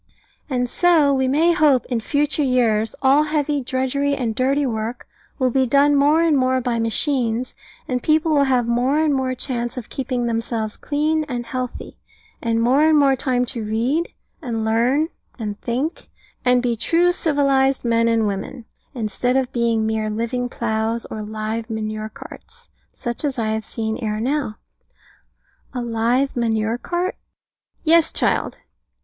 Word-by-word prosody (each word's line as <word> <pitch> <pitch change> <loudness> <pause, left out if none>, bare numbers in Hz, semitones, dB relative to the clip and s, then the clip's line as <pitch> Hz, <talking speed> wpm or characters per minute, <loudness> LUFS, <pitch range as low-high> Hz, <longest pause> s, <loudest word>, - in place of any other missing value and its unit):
And 250 -2 0
so, 310 0 +3
we 265 -1 +1
may 310 +6 +3
hope, 295 -6 +3
in 245 -3 -1
future 290 +6 0
years 230 -5 +1
all 275 +3 +5
heavy 295 -1 0
drudgery 265 +3 -1
and 235 -5 -2
dirty 275 +5 +1
work 225 0 -4 0.3
will 255 -2 +1
be 260 +1 +2
done 285 +3 +4
more 295 +4 +4
and 325 -3 +3
more 260 -1 +2
by 240 -2 -1
machines, 240 0 -1 0.3
and 250 -1 -1
people 315 +3 +2
will 285 -1 +4
have 255 -3 +2
more 245 +5 +1
and 310 -2 +2
more 260 -1 -1
chance 240 -2 -3
of 245 - -6
keeping 255 -2 -2
themselves 230 -2 -2
clean 305 +2 0
and 245 -4 -4
healthy, 255 +1 -6 0.4
and 230 -1 0
more 260 +5 +3
and 310 0 +5
more 275 -2 +4
time 250 -1 0
to 235 -2 -5
read, 240 +10 0 0.3
and 230 -6 -3
learn, 245 +8 +2 0.3
and 210 -4 -5
think, 260 +8 -3 0.3
and 250 0 +3
be 240 -2 +1
true 340 +9 +2
civilised 275 -5 +1
men 230 0 +2
and 230 -1 +2
women, 210 +5 -4 0.3
instead 245 +3 0
of 260 -2 -1
being 230 -2 +1
mere 220 -1 -1
live 225 +3 -3 0.2
ploughs, 225 0 -2
or 215 - -4
live 215 +2 -4
manure 215 -1 -4
carts, 475 - -12 0.2
such 240 +1 -4
as 285 -3 -1
I 220 -2 -1
have 220 0 -1
seen 220 0 -3
ere 215 -3 -2
now. 260 -2 -1 1.2
A 250 - -1
live 235 +4 0
manure 225 -1 0
cart? 355 +5 -2 0.7
Yes, 330 0 +4
child. - - +1
250 Hz, 160 wpm, -21 LUFS, 230-285 Hz, 1.2 s, all